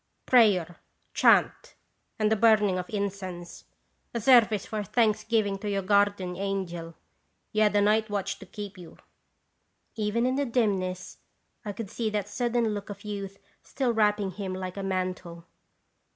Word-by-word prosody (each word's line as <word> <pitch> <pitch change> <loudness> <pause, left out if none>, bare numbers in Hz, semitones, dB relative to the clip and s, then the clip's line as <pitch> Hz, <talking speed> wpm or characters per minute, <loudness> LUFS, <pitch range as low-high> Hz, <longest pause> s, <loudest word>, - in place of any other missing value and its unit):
" - - -48
Prayer, 195 -9 +4 0.4
chant, - - +3 0.4
and 215 -1 +1
the - - +4
burning 210 -4 +3
of 180 - -6
incense; 190 -4 -5 0.5
a - - 0
service 225 -4 +4
of 210 -2 -2
thanksgiving 215 -3 +1
to 210 0 -4
your 200 -1 -1
guardian 200 -2 +1
angel. 175 -4 -4 0.6
You 215 - 0
had 210 -1 +3
a 205 - +4
night 215 +1 +2
watch 195 -1 -3
to - - -12
keep 205 -3 -8
you." 170 -2 -12 1.0
Even 220 +2 -1
in 255 +1 0
the 285 - +1
dimness 195 -6 -1 0.4
I 210 - -4
could 200 -1 -7
see 225 -2 -2
that 210 -2 -2
sudden 235 0 0
look 205 0 -6
of 200 0 -8
youth 200 -1 -6 0.2
still 255 -3 -2
wrapping 210 -3 +1
him 190 0 -5
like 185 -1 -5
a 200 - -5
mantle. 185 -3 -4
205 Hz, 155 wpm, -27 LUFS, 190-215 Hz, 1.0 s, Prayer